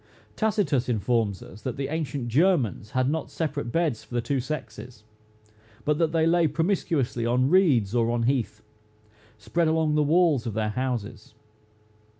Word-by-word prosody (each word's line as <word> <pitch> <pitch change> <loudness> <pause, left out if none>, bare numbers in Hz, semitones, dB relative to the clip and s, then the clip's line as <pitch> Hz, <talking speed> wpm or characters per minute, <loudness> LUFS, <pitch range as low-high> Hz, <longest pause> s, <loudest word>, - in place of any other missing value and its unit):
Tacitus 190 - 0
informs 110 -3 0
us 105 - -13
that 125 0 -4
the 135 0 -3
ancient 145 -5 -3
Germans 130 - +1
had 130 +2 0
not 160 +3 -2
separate 145 -6 -3
beds 160 -8 0
for 120 - -10
the - - +2
two 135 +4 -1
sexes, 120 -4 -7 0.8
but 150 0 +1
that 165 -2 +2
they 160 -1 +2
lay 170 0 +3
promiscuously 155 - -1
on 125 +4 +1
reeds 140 - +3
or 115 -1 +2
on 120 0 0
heath, 115 -4 -1 0.7
spread 165 +10 0
along 160 -1 +1
the 150 - +3
walls 150 -5 +3
of 110 - -4
their 110 -1 0
houses. 115 -2 -4
130 Hz, 155 wpm, -26 LUFS, 115-160 Hz, 0.8 s, lay